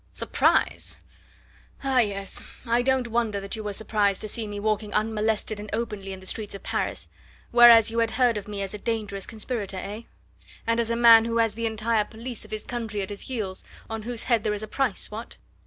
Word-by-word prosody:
"Surprise? - - +1 0.8
Ah, 265 -2 +3
yes! 200 -4 0 0.2
I 235 +1 +2
don't 260 -1 +1
wonder 230 -3 0
that 195 +3 -4
you 220 - -6
were 210 - -3
surprised 205 -1 0
to 215 - -3
see 220 +1 -2
me 205 0 -5
walking 210 0 -1
unmolested 215 0 0
and 210 0 -7
openly 210 -4 -3
in 190 - -7
the 190 - -14
streets 210 +1 -2
of 200 - -10
Paris - - -2 0.4
whereas 235 -2 +8
you 230 - -1
had 230 -1 +2
heard 245 -3 +4
of 210 -1 -5
me 205 -1 -3
as 195 - -5
a 210 - -6
dangerous 210 -3 -3
conspirator, 215 -3 -4
eh? 205 +4 -5 0.6
and 230 0 +1
as 230 -1 +1
a 230 - +1
man 230 -1 +8
who 230 0 -1
has 225 -2 +2
the 230 +1 -2
entire 220 0 +1
police 230 +3 -7
of - - -14
his 215 -1 -5
country 225 -4 -3
at 190 - -5
his 200 - -7
heels 210 -7 -4 0.3
on 225 0 -3
whose 235 +1 -3
head 235 -4 +2
there 210 - 0
is 210 - -4
a - - -5
price 245 -3 0
what?" 220 +3 -6
220 Hz, 215 wpm, -26 LUFS, 205-230 Hz, 0.8 s, whereas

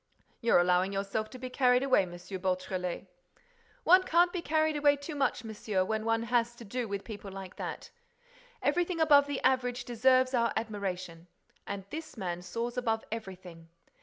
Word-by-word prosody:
"You're 235 - +4
allowing 180 +2 +3
yourself 200 +2 -2
to 255 - -10
be 255 0 -7
carried 250 -1 +3
away, 270 -1 +4
M. 180 -2 -6 0.3
Beautrelet." 185 -1 -2 0.8
"One 365 +3 +7
can't 350 -1 +3
be 360 - -2
carried 315 -1 +1
away 290 -1 +4
too 285 +3 -7
much, 275 -4 0
monsieur, 210 -3 -2
when 220 +2 -2
one 225 0 +1
has 235 0 +1
to 235 - -11
do 245 +3 -3
with 200 -1 -4
people 205 -3 -8
like 190 -1 -8
that. - - -6 0.7
Everything 350 -1 +1
above 290 -3 +6
the 285 -2 -2
average 250 -1 +1
deserves 255 +2 +3
our 235 -2 +2
admiration. 185 -6 -4 0.4
And 200 -1 -5
this 315 -4 -7
man 180 -3 -3
soars 230 +7 -4
above 225 -3 0
everything. 185 -6 -8
230 Hz, 165 wpm, -30 LUFS, 195-265 Hz, 0.8 s, One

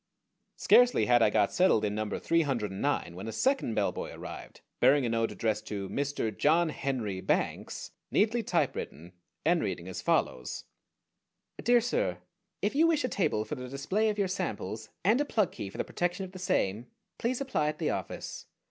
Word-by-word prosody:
Scarcely 245 0 +5
had 120 -1 +4
I 110 - +6
got 100 - +2
settled 180 - +4
in 105 - -1
number 110 -1 -2
three 165 0 +2
hundred 120 -9 -1
and 95 - -6
nine 140 -11 0
when 95 +5 -7
a - - -3
second 260 - +1
bellboy - - -1
arrived, - - -9 0.2
bearing 135 +2 +5
a - - 0
note 115 0 0
addressed 110 -1 -1
to 100 -2 -4
"Mr. 140 -6 -2
John 165 +3 +3
Henry 120 -10 -3
Banks," - - -2 0.2
neatly 225 +3 +2
typewritten, 85 - -2 0.3
and 170 +1 +3
reading 95 -3 -3
as 95 - -5
follows: 60 0 0 1.0
DEAR 240 0 +5
SIR, 220 - 0 0.5
If 205 - +1
you 315 +4 +4
wish 320 -3 +2
a 255 - 0
table 110 - 0
for 110 - -5
the 125 -3 -5
display 190 - 0
of 210 - -2
your 200 -2 +1
samples 110 - -4
and 220 +9 +4
a - - +3
plug 215 - +1
key 100 - -6
for - - -11
the - - 0
protection 175 +2 -2
of 185 - -11
the 185 - -9
same, 120 - 0 0.3
please 240 +2 0
apply 260 - 0
at 150 - -2
the - - 0
office. - - -5
140 Hz, 190 wpm, -30 LUFS, -, 1.0 s, I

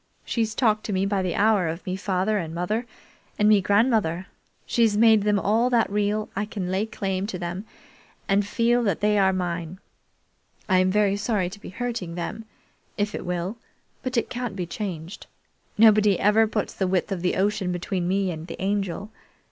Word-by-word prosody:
She's 225 -2 -1
talked 215 -4 +2
to 210 - -2
me 190 +1 +1
by 200 -1 0
the 180 -2 -2
hour 205 -4 +3
of 165 +3 -5
me 185 -1 -2
father 190 +2 0
and 165 -2 -5
mother 215 +7 -2 0.5
and 210 - +3
me 210 -2 +6
grandmother. 200 -4 +2 0.4
She's 225 -3 +2
made 220 -1 +6
them 205 0 +2
all 220 +5 +2
that 235 -4 +2
real 210 +1 0
I 205 +2 -1
can 195 -4 -4
lay 195 +4 0
claim 195 -3 -2
to 195 - -4
them 175 +3 -5 0.6
and 200 0 +3
feel 235 +4 +1
that 195 -6 0
they 210 0 +3
are 190 -1 +4
mine. 175 -2 -3 0.9
I'm 185 -1 +3
very 200 0 +2
sorry 205 -4 -1
to 205 - -10
be - - -8
hurting 195 -5 -4
them, 215 +6 -5 0.5
if 205 0 -1
it - - -5
will, 180 +5 -2 0.4
but 255 -1 -3
it 235 - +1
can't 245 -4 -4
be 180 -2 -3
changed. 175 -1 -6 0.5
Nobody 210 -3 +5
ever 215 +2 +4
puts 210 -1 -2
the 190 - -1
width 185 +2 0
of 185 -3 -2
the 180 - 0
ocean 195 -1 0
between 180 0 -2
me 190 0 +1
and 160 0 -7
the - - -8
Angel. 195 +1 -2
200 Hz, 190 wpm, -25 LUFS, 185-215 Hz, 0.9 s, me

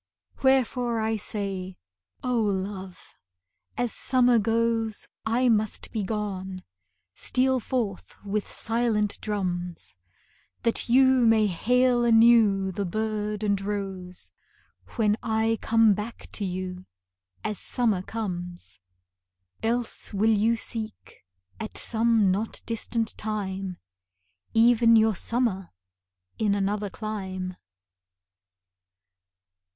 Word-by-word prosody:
Wherefore 250 -3 +2
I 220 0 0
say: 195 -3 -4 0.5
O 250 -1 0
love, 190 -2 -4 0.6
as 245 -2 0
summer 250 -2 +4
goes, 225 0 0 0.2
I 245 +3 +2
must 215 -2 +1
be 220 - -2
gone, 190 -2 -4 0.5
steal 260 0 +1
forth 225 -6 -3
with 205 +1 -2
silent 225 -3 0
drums, 175 - -4 0.7
That 230 0 0
you 260 +3 +6 0.2
may 220 -1 +5
hail 245 +6 +2
anew 225 -4 +5
the 200 +2 -3
bird 210 +2 -2
and 200 -2 +1
rose 195 -3 -5 0.6
When 215 -3 +2
I 220 0 0
come 225 -2 +4
back 210 +4 -6
to 205 - -2
you, 185 0 -5 0.6
as 210 - -3
summer 225 -7 0
comes. 180 - -6 0.8
Else 230 -2 -1
will 220 +3 +3
you 225 +3 +3
seek, 220 - -7 0.4
at 220 - -2
some 225 -3 +3
not 210 +4 -3
distant 230 0 -2
time, 195 -4 -3 0.8
Even 230 0 +6
your 220 0 +5
summer 220 -5 -1 0.7
in 205 -2 +2
another 205 +1 -1
clime. 190 -3 -5
215 Hz, 100 wpm, -26 LUFS, 195-230 Hz, 0.8 s, you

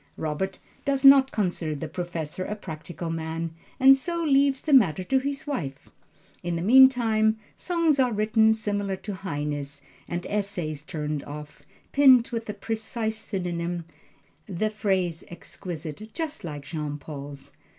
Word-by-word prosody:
Robert 160 +5 -2 0.3
does 275 -1 0
not 275 -1 +8
consider 175 -6 -1
the 155 +2 -5
Professor 170 0 -4
a 210 - -4
practical 165 -3 -6
man, 165 0 -3 0.3
and 270 0 +8
so 335 +5 -3
leaves 275 -2 +3
the 305 - 0
matter 190 - +5
to 265 +8 +2
his 275 +1 -3
wife. 150 - -4 0.5
In 175 0 -2
the 165 - -2
meantime 225 -2 +5 0.2
songs 335 -5 +1
are 255 -2 +3
written 220 +1 +3
similar 205 -2 -2
to 205 +2 -6
Heine's, 145 -6 -4 0.2
and 175 0 -4
essays 190 -8 -2
turned 150 -1 -4
off, 150 0 -9 0.3
pinned 260 -4 +6
with 230 -2 -4
the 210 - -4
precise 220 +1 -3
synonym, 175 -4 -3 0.6
the 210 +4 -1
phrase 190 -6 0
exquisite, 175 +2 -7
just 320 -3 -4
like 150 -4 -6
Jean 150 -1 -4
Paul's. 140 -1 -9
190 Hz, 140 wpm, -26 LUFS, 160-235 Hz, 0.6 s, not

